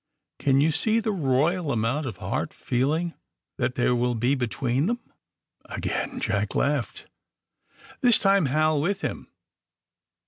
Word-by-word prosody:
Can 135 -1 +3
you 160 +2 +3
see 220 +8 +2
the 220 -1 -1
royal 155 0 +1
amount 120 +6 0
of 110 -6 -6
hard - - -3
feeling 155 +7 0 0.5
that 125 - 0
there 125 0 +2
will 120 0 +1
be 120 +4 +1
be 130 -3 0
tween 130 +6 0
themf 240 +2 0 0.7
Again - - -3
Jack - - -1
laughed. - - -1 1.0
This 245 -3 +6
time 195 -5 +3
Hal 155 +2 +2
with 195 +5 -1
him. - - -4
145 Hz, 140 wpm, -25 LUFS, 125-175 Hz, 1.0 s, This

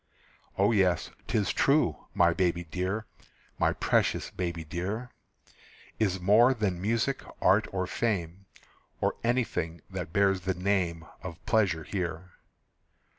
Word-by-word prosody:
O 100 +3 +4
yes, 95 -5 +2 0.2
'tis 105 -3 +1
true, 140 - +2
my 85 0 +4
baby 85 -1 0
dear, 95 +6 -3 0.5
My - - +3
precious - - +1
baby 85 -2 -3
dear, 100 +10 -4 0.9
Is 95 -4 +1
more 110 +8 +5
than 95 -6 -1
music, 115 +6 0 0.2
art, 105 +3 +4
or 95 -1 -1
fame, 95 -3 -2 0.5
Or - - +1
anything 115 -9 -1
that 90 -4 -5
bears 95 -1 +3
the 95 +1 -1
name 90 -3 0 0.2
Of 85 -4 -8
pleasure 95 -7 +2
here. 90 -1 -4
95 Hz, 125 wpm, -29 LUFS, 85-105 Hz, 0.9 s, more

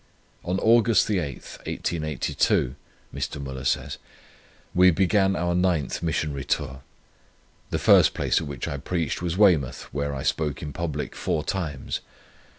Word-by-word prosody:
"On 90 +2 -1
August 115 +1 +4
8th, 85 - -3
1882," 75 -5 0 0.4
Mr. - - -4
Müller 65 -2 -4
says, - - -1 0.7
"we 90 +1 +6
began 95 +2 +3
our 85 0 0
ninth 90 -6 0
Missionary 75 -4 -1
Tour. 65 -1 -2 0.9
The - - -1
first - - +5
place - - +1
at - - -5
which 70 -4 -5
I 70 - -3
preached 80 +2 -2
was 90 0 -2
Weymouth, 90 - +3
where 70 0 -2
I 65 - -4
spoke 75 -3 -1
in 75 -1 -5
public 80 -3 -4
four 75 - -1
times. 80 -9 -3
80 Hz, 140 wpm, -25 LUFS, 70-90 Hz, 0.9 s, we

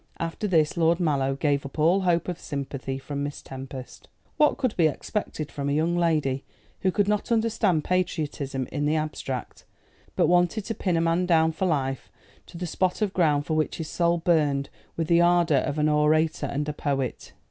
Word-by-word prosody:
After 165 +6 -3
this 160 -4 +2
Lord 165 +1 +3
Mallow 140 -5 +1
gave 140 -1 0
up 140 +2 -9
all 170 +6 +3
hope 175 -2 +1
of 180 -1 -4
sympathy 140 -1 -4
from 140 +1 -5
Miss 145 0 -5
Tempest. 130 -1 -9 0.3
What 300 - +4
could 255 -5 -1
be 165 -3 +4
expected 155 -1 -4
from 140 0 -3
a - - +1
young 160 +3 +1
lady 155 -6 +1 0.4
who 190 - +1
could 205 +1 +1
not 210 +3 -1
understand 220 -8 +2
patriotism 150 -7 -1
in 145 -1 -1
the 155 - +2
abstract, 150 -5 -4 0.5
but - - +3
wanted 175 +4 +2
to 225 - -2
pin 185 -5 -1
a - - +2
man 170 +2 +1
down 160 -2 +4
for 185 +4 -1
life 135 -5 -1 0.4
to - - -11
the 180 - -4
spot 185 +4 0
of 200 -2 -1
ground 150 -5 +2
for 155 - -2
which 155 0 0
his 160 -2 -5
soul 170 0 +1
burned 150 -5 +1 0.3
with 165 - 0
the 170 0 +4
ardour 175 -3 +4
of 145 +3 -2
an 150 0 +2
orator 155 +1 +2
and 145 +1 -2
a 150 - -2
poet? 135 -4 -3
160 Hz, 195 wpm, -26 LUFS, 145-175 Hz, 0.5 s, What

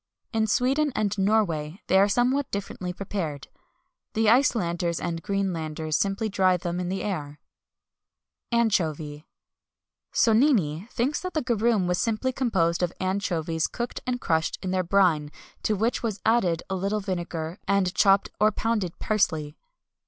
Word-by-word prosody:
In 220 -1 +1
Sweden 270 +7 +2
and 210 -2 0
Norway 190 -5 +1
they 190 - +4
are 200 +1 +4
somewhat 255 +6 +1
differently 185 -2 -4
prepared. 180 -7 -5 0.6
The 220 -1 +3
Icelanders 175 -9 +2
and 170 -1 -3
Greenlanders 160 -5 -2
simply 200 +4 0
dry 185 -3 +2
them 175 0 -3
in 180 -1 -2
the 190 +1 -2
air.[XXI 150 -7 -10
211] 235 0 +4
ANCHOVY. 155 -7 -1 0.9
Sonnini 220 - +3
thinks 260 +6 -1
that 365 0 -5
garum 230 -4 +2
was 180 0 0
simply 230 +3 0
composed 185 -11 +1
of 175 -1 +1
anchovies 175 -4 -1
cooked 240 0 -4
and 250 -1 -1
crushed 160 -5 0
in 185 - -2
their 185 0 +1
brine, 175 -5 +2 0.3
to 215 - +1
which 225 +5 0
was 215 -4 -2
added 190 -8 +2
a - - -3
little 195 +3 -1
vinegar, 175 -3 -4
and 195 -2 +2
chopped 195 0 +4
or 215 0 +4
pounded 210 -5 -1
parsley. 160 -8 0
195 Hz, 145 wpm, -26 LUFS, 170-220 Hz, 0.9 s, they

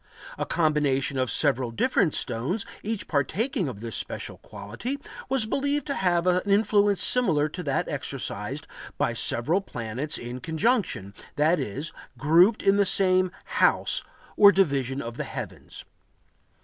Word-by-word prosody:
A - - -4
combination 145 -4 +1
of 130 -2 0
several 130 -1 +2
different 160 - +1
stones, 130 - -2 0.2
each 215 0 -4
partaking 180 - -1
of 105 -5 -9
this 115 -2 -4
special - - -3
quality, 110 - -6 0.3
was 260 -4 +2
believed 285 +4 -1
to 280 - -2
have 175 -6 +1
an 180 0 +3
influence 205 -1 +3
similar 165 -12 +3
to 180 - -7
that - - -1
exercised - - -4 0.3
by - - 0
several 160 +12 +3
planets 125 - -4
in 120 +1 -7
conjunction,—that 160 - -1
is, 140 +10 -4 0.2
grouped 170 - +4
in 195 0 +4
the 200 - +4
same 185 -1 +2
"house" - - +2 0.3
or 200 -1 +8
division 140 -8 0
of 115 0 -7
the - - -2
heavens. - - -8
165 Hz, 135 wpm, -26 LUFS, 130-200 Hz, 0.3 s, or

